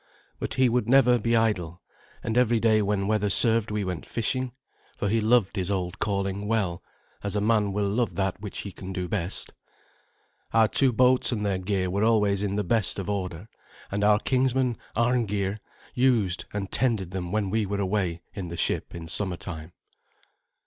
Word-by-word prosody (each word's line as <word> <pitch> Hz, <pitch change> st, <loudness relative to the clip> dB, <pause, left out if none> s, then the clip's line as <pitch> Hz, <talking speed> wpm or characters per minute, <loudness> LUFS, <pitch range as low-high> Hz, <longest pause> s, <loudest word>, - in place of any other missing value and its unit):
But -, -, -3 dB
he 130 Hz, -1 st, +4 dB
would 120 Hz, -1 st, 0 dB
never 125 Hz, -2 st, +5 dB
be 115 Hz, +2 st, +1 dB
idle, 90 Hz, -7 st, 0 dB, 0.4 s
and 115 Hz, -, -2 dB
every 120 Hz, -2 st, +3 dB
day 110 Hz, -1 st, +3 dB
when 100 Hz, -1 st, 0 dB
weather 105 Hz, -1 st, +1 dB
served 115 Hz, +2 st, +3 dB
we 105 Hz, -1 st, -1 dB
went 90 Hz, -3 st, -4 dB
fishing, 130 Hz, +2 st, -2 dB, 0.5 s
for 100 Hz, -, -1 dB
he 110 Hz, +3 st, +1 dB
loved 110 Hz, -2 st, +3 dB
his 95 Hz, -2 st, -1 dB
old 90 Hz, -3 st, -2 dB
calling 100 Hz, 0 st, -1 dB
well, 100 Hz, -6 st, 0 dB, 0.4 s
as 100 Hz, 0 st, -3 dB
a -, -, +2 dB
man 105 Hz, -1 st, +2 dB
will 100 Hz, +1 st, 0 dB
love 110 Hz, +3 st, 0 dB
that 95 Hz, 0 st, -1 dB
which 105 Hz, -2 st, -6 dB
he 100 Hz, -, -7 dB
can 95 Hz, +1 st, -8 dB
do 90 Hz, -1 st, -3 dB
best. 90 Hz, -1 st, -2 dB, 1.0 s
Our 115 Hz, -1 st, +5 dB
two 130 Hz, +4 st, +3 dB
boats 125 Hz, +2 st, +3 dB
and 105 Hz, -3 st, -2 dB
their 95 Hz, -2 st, 0 dB
gear 95 Hz, -1 st, -1 dB
were 100 Hz, +3 st, 0 dB
always 105 Hz, -3 st, +3 dB
in 100 Hz, -1 st, -1 dB
the 105 Hz, -, 0 dB
best 105 Hz, +2 st, +1 dB
of 100 Hz, +1 st, -3 dB
order, 90 Hz, -1 st, -4 dB, 0.4 s
and 100 Hz, +1 st, -1 dB
our 105 Hz, 0 st, +5 dB
kinsman, 130 Hz, +1 st, +1 dB, 0.2 s
Arngeir, 110 Hz, -4 st, 0 dB, 0.3 s
used 115 Hz, -8 st, +2 dB
and 100 Hz, -2 st, -4 dB
tended 110 Hz, -8 st, 0 dB
them 90 Hz, -2 st, -4 dB
when 105 Hz, -2 st, 0 dB
we 110 Hz, -1 st, 0 dB
were 100 Hz, +1 st, -2 dB
away 95 Hz, -4 st, -1 dB
in 95 Hz, -3 st, -5 dB
the 85 Hz, 0 st, -6 dB
ship -, -, -1 dB
in 85 Hz, -1 st, -7 dB
summertime. 85 Hz, -3 st, -3 dB
105 Hz, 185 wpm, -26 LUFS, 95-115 Hz, 1.0 s, never